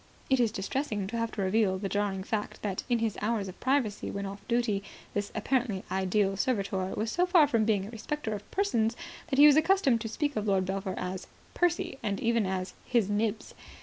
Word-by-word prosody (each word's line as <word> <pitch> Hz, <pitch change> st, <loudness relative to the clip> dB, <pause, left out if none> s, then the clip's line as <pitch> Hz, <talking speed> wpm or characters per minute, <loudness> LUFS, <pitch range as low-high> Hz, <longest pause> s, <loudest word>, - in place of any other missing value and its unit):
It 265 Hz, -, +4 dB
is 235 Hz, -3 st, +3 dB
distressing 210 Hz, 0 st, -2 dB
to 225 Hz, +5 st, -4 dB
have 230 Hz, 0 st, -1 dB
to 200 Hz, -, -2 dB
reveal 190 Hz, 0 st, +2 dB
the 195 Hz, +1 st, -3 dB
jarring 200 Hz, -1 st, -1 dB
fact 210 Hz, +1 st, -3 dB
that, 195 Hz, -3 st, -2 dB
in 240 Hz, -, +3 dB
his 225 Hz, -2 st, -1 dB
hours 215 Hz, -2 st, 0 dB
of 185 Hz, -, -9 dB
privacy 260 Hz, -6 st, 0 dB
when 200 Hz, 0 st, -4 dB
off 200 Hz, +1 st, -6 dB
duty, 235 Hz, -4 st, +1 dB, 0.3 s
this 205 Hz, 0 st, -2 dB
apparently 220 Hz, -3 st, 0 dB
ideal 190 Hz, +1 st, +1 dB
servitor 200 Hz, -5 st, 0 dB
was 220 Hz, +1 st, -1 dB
so 360 Hz, +1 st, +2 dB
far 350 Hz, -4 st, +6 dB
from 230 Hz, -5 st, +1 dB
being 205 Hz, -3 st, +1 dB
a 210 Hz, -, -8 dB
respecter 225 Hz, +1 st, -4 dB
of 205 Hz, 0 st, -7 dB
persons 230 Hz, -, +1 dB, 0.3 s
that 270 Hz, -5 st, -1 dB
he 290 Hz, -, +9 dB
was 300 Hz, 0 st, +8 dB
accustomed 315 Hz, -, +3 dB
to 225 Hz, -, -3 dB
speak 290 Hz, +5 st, -1 dB
of 215 Hz, 0 st, -1 dB
Lord 190 Hz, -2 st, +2 dB
Belpher 190 Hz, 0 st, -3 dB
as 180 Hz, 0 st, -4 dB, 0.3 s
"Percy", 345 Hz, -6 st, 0 dB
and 200 Hz, -3 st, -2 dB
even 230 Hz, -3 st, +1 dB
as 185 Hz, 0 st, -3 dB
"His 230 Hz, -5 st, +1 dB
Nibs". 215 Hz, +1 st, -1 dB
215 Hz, 210 wpm, -29 LUFS, 195-245 Hz, 0.3 s, he